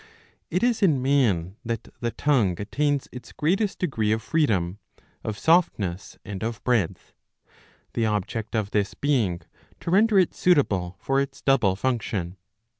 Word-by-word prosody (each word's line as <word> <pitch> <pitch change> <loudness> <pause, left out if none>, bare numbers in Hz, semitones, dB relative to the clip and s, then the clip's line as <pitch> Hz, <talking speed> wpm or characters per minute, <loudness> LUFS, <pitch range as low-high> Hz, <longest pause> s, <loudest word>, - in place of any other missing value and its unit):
It - - 0
is 240 -2 +2
in 160 -9 +4
man 110 -10 +1
that 115 -2 -4
the 120 - -1
tongue 115 - +1
attains 140 +6 0
its 125 - -10
greatest 190 +7 0
degree 115 -12 0
of 110 +1 0
freedom, 105 - 0 0.4
of 110 -1 -4
softness, 105 - +1
and 100 -3 -6
of 115 -1 -4
breadth; 115 -9 0 0.8
the 115 -1 +1
object 110 +2 -2
of 105 -2 -1
this 100 -2 0
being 115 -12 0 0.4
to 170 - -4
render 210 +2 +4
it 185 -3 +4
suitable 95 - +2
for 135 0 +1
its 140 -1 -5
double 120 -9 +3
function. 100 -6 -2
115 Hz, 145 wpm, -25 LUFS, 100-145 Hz, 0.8 s, in